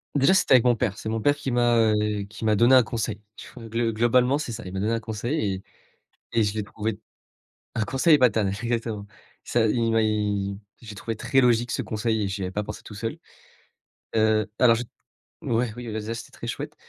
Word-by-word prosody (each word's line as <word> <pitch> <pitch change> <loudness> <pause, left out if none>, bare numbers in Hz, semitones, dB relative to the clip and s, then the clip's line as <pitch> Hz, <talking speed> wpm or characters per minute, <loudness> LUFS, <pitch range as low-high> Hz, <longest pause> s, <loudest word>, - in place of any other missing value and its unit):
déjà, 140 +5 +4
c'était 185 -8 +5
avec 125 - +4
mon 120 -1 +4
père. 105 -2 -1
C'est - - -7
mon 110 0 -2
père 145 +5 +3
qui 140 -2 -4
m'a, 120 -1 +3
heu, 105 -2 +2
qui 110 +3 -10
m'a 110 -1 +3
donné 120 +5 +6
un 130 - +7
conseil. 110 -2 -3 0.2
Ch - - -11 0.2
glo 115 0 0
globalement, 125 +4 +3
c'est 150 -5 -4
ça. 115 +1 -6
Il 90 - -7
m'a 95 - -3
donné 105 +3 0
un 115 - 0
conseil 110 +1 -2
et 95 - -10 0.7
et 115 -1 +3
je 100 -1 0
l'ai 105 - -1
trouvé 105 +1 -4 0.8
un 115 - 0
conseil 145 +6 +4
paternel, 110 -6 +2
exactement. 115 -3 -2 0.4
Ça 115 -2 +1
il 115 +1 +1
m'a 115 0 +3
il 105 -2 -1 0.2
je 115 - -12
l'ai 105 - -8
trouvé 115 +3 -5
très 135 +4 +2
logique 120 -1 +2
ce - - -1
conseil 110 0 -1
et - - -1
j'y 95 +1 -4
avais 90 - -3
pas 105 - -1
pensé 105 0 -8
tout 105 - -10
seul. 115 +2 -4 1.0
Heu, 110 -2 +3
alors, 120 -2 +6
je 120 - -2 0.6
ouais, 115 -1 0
oui, 120 0 -7
bah, 110 0 -3
déjà, 110 +2 -4
c'était 115 0 -8
très - - -9
chouette. - - -5
115 Hz, 225 wpm, -25 LUFS, 105-120 Hz, 1.0 s, un